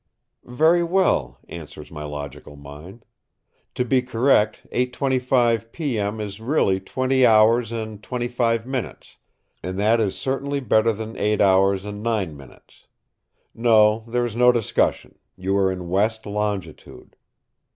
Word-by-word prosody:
"Very 160 +7 +3
well," 170 - +1
answers 75 -3 -10
my 75 -1 -7
logical 75 0 -8
mind. 75 +10 -12 0.7
"To 125 - -1
be 130 +1 +2
correct, 120 -3 +1
8.25 125 -3 0
P.M. 110 -9 -3
is 105 0 -6
really 110 -7 +1
twenty 130 +6 0
hours 115 0 +4
and 110 -2 -6
twenty 120 +2 -3
five 115 -2 0
minutes, 130 -2 -6 0.4
and 90 +1 -5
that 110 +3 +2
is 100 -3 -1
certainly 140 +1 -2
better 115 -3 +2
than 110 +1 -7
eight 105 0 0
hours 95 0 +3
and 105 0 -7
nine 105 -8 -2
minutes. 70 -3 -17 0.7
No, 110 -1 +3
there 120 +1 0
is 115 -2 -5
no 125 +1 +5
discussion; 120 -3 -1 0.2
you 95 +1 -1
are 95 -1 +2
in 90 -1 -6
west 110 +5 0
longitude." 100 -5 -5
110 Hz, 135 wpm, -22 LUFS, 95-125 Hz, 0.7 s, no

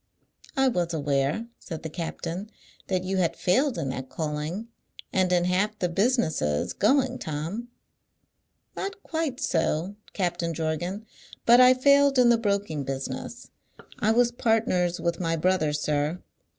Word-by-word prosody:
"I 270 0 +4
was 175 -8 0
aware," 145 +7 0
said 165 -2 -7
the 160 - -4
captain, 175 +3 -5 0.4
"that 185 -2 0
you 190 +1 -1
had 170 -2 +1
failed 250 - +1
in 145 -5 -2
that 130 0 -5
calling, 155 +7 -3 0.5
and 185 -2 +2
in 175 -1 +3
half 200 +4 +1
the 180 - 0
businesses 170 - +1
going, 260 -2 +2
Tom." 165 +10 -4 1.1
"Not 400 +1 -5
quite 320 -6 -2
so, 165 +2 0 0.2
Captain 175 -3 -1
Jorgan; 170 +6 -3 0.4
but 240 +2 +7
I 255 0 +7
failed 280 +1 +4
in 245 -1 +6
the 235 -1 +4
broking 200 -8 -1
business. 135 - -5 0.5
I 215 - +2
was 240 +1 +3
partners 220 -7 +1
with 170 -1 -1
my 165 -2 0
brother, 165 -2 +1
sir. 150 +2 -1
180 Hz, 140 wpm, -26 LUFS, 160-230 Hz, 1.1 s, but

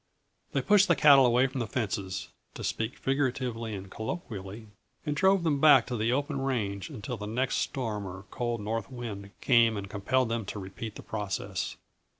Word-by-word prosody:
They - - +1
pushed 205 -1 +5
the - - +4
cattle 140 -3 +7
away 125 +2 +4
from 130 0 -3
the 115 - -2
fences 100 -5 -3 0.3
to - - -6
speak 110 +2 -2
figuratively 130 -5 -1
and 95 0 -8
colloquially 110 - -6 0.4
and 150 -1 -1
drove 190 +3 +4
them 150 -4 +1
back 140 -5 +7
to 125 - -4
the 115 +1 +1
open 140 +1 -1
range 105 -8 -2
until 115 +4 -5
the 105 0 -6
next 125 +4 0
storm 110 -6 -2
or 95 +2 -8
cold 120 -2 -2
north 115 +2 -3
wind 110 -6 -6
came 115 -4 +4
and 100 -1 -5
compelled 115 +5 0
them 115 -1 -1
to 105 - -6
repeat 100 +3 -7
the - - -9
process. 105 -3 -3
115 Hz, 180 wpm, -29 LUFS, 105-135 Hz, 0.4 s, cattle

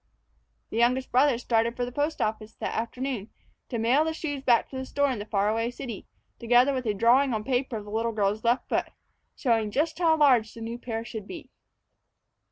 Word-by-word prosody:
The - - -3
youngest 250 +3 +2
brother 260 0 +4
started 235 -1 0
for 245 - 0
the 245 - -7
post 295 +4 -1
office 215 0 -4
that - - -4
afternoon 235 -1 -3 0.4
to 240 - -3
mail 240 +7 +3
the 320 0 -2
shoes 290 -4 -4
back 240 -3 +3
to - - -8
the 260 - -3
store 285 -1 +1
in 245 - -3
the 205 - -6
far 200 -1 +1
away 225 +2 0
city, 245 -4 -7 0.3
together 245 +4 +4
with 255 -3 -3
a 210 - 0
drawing 240 +4 +4
on 215 - -3
paper 250 -1 -1
of 210 - -8
the 205 - -10
little 225 +2 0
girl's 210 0 0
left 240 +2 +1
foot, - - 0 0.5
showing 225 -5 +1
just 315 +8 -1
how 325 -2 +4
large 250 -7 +4
the 230 - -9
new 230 +1 -5
pair 225 -2 -4
should 215 -4 -7
be. 345 - -9
240 Hz, 210 wpm, -27 LUFS, 225-270 Hz, 0.5 s, brother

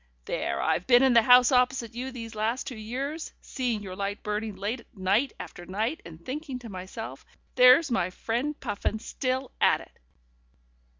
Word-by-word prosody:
"There - - -2
I've 175 - 0
been 245 0 +6
in 265 -2 +5
the 235 - +7
house 250 +2 +7
opposite 250 -2 +2
you 255 +3 -4
these 230 -3 -7
last 220 +4 -1
two 255 - -6
years, 270 +9 -5
seeing 240 -5 -3
your 185 -2 -7
light 200 +1 -4
burning 210 0 -3
late 210 +6 -3 0.2
night 200 +8 +2
after 175 - -8
night, 220 - -2
and 165 0 -12
thinking 275 -1 -4
to 245 -2 -10
myself: 190 +4 -7 0.3
'There's 255 +4 +7
my 190 -6 +1
friend 245 +10 -2
Puffin 210 -2 -2
still 255 +3 -3
at - - +5
it! - - -16
235 Hz, 170 wpm, -27 LUFS, 210-255 Hz, 0.3 s, the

